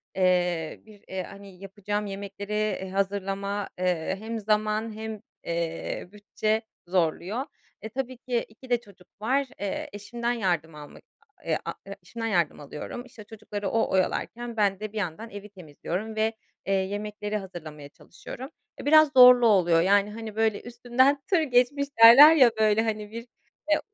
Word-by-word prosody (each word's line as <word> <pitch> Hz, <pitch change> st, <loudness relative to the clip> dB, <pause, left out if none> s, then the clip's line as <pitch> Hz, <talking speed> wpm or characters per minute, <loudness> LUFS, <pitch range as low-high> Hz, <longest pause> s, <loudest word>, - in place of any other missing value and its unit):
eee, 180 Hz, -3 st, +1 dB
bir, 210 Hz, -2 st, -17 dB
eee, 190 Hz, -1 st, -4 dB
hani, 195 Hz, -1 st, -12 dB
yapacağım 205 Hz, +1 st, -4 dB
yemekleri, 200 Hz, +1 st, -6 dB
eee, 210 Hz, -3 st, -1 dB
hazırlama, 200 Hz, +1 st, -2 dB
eee, 180 Hz, -1 st, 0 dB
hem 225 Hz, +1 st, -5 dB
zaman 215 Hz, +1 st, 0 dB
hem, 220 Hz, -1 st, -6 dB, 0.2 s
eee, 170 Hz, 0 st, -3 dB
bütçe 215 Hz, +1 st, -2 dB, 0.3 s
zorluyor. 185 Hz, -, -1 dB, 0.4 s
E, 220 Hz, -, -6 dB
tabii 255 Hz, +1 st, -5 dB
ki 245 Hz, -1 st, -2 dB
2 240 Hz, +4 st, -16 dB
de 245 Hz, -1 st, +2 dB
çocuk 190 Hz, -4 st, -19 dB
var. 270 Hz, +5 st, +1 dB
Eee, 200 Hz, -1 st, -4 dB
eşimden 235 Hz, +4 st, -3 dB
yardım 175 Hz, -9 st, -1 dB
almak, 150 Hz, -1 st, -12 dB, 0.4 s
eee, -, -, +1 dB
a -, -, -3 dB
e-eşimden 230 Hz, -1 st, -7 dB
yardım 175 Hz, -8 st, 0 dB
alıyorum. 150 Hz, -, -7 dB
İşte, 240 Hz, -3 st, -13 dB
çocukları 205 Hz, -2 st, -6 dB
o 225 Hz, -, +1 dB
oyalarken 230 Hz, +5 st, -1 dB
ben 200 Hz, -2 st, +2 dB
de 215 Hz, -1 st, -5 dB
bir -, -, -6 dB
yandan 205 Hz, +3 st, -4 dB
evi 205 Hz, 0 st, -9 dB
temizliyorum 190 Hz, +4 st, -6 dB
ve, 220 Hz, +1 st, +1 dB, 0.3 s
eee, 195 Hz, -, 0 dB
yemekleri 205 Hz, +2 st, -2 dB
hazırlamaya 155 Hz, -7 st, -9 dB
çalışıyorum. 255 Hz, -, -10 dB, 0.3 s
Eee, -, -, -8 dB
biraz 310 Hz, 0 st, +6 dB
zorlu 250 Hz, -1 st, +9 dB
oluyor, 175 Hz, -6 st, +4 dB
yani, 200 Hz, +2 st, +3 dB
hani, 220 Hz, -1 st, -8 dB
böyle 220 Hz, -1 st, +1 dB
üstümden 250 Hz, +3 st, +1 dB
tır 360 Hz, -4 st, +3 dB
geçmiş 280 Hz, 0 st, +2 dB, 0.2 s
derler 285 Hz, +8 st, +11 dB
ya, 255 Hz, -6 st, +6 dB
böyle 215 Hz, 0 st, +4 dB
hani 215 Hz, -2 st, -3 dB
bir, 230 Hz, +2 st, -8 dB, 0.4 s
eee, 305 Hz, -, +4 dB
210 Hz, 155 wpm, -26 LUFS, 190-230 Hz, 0.4 s, derler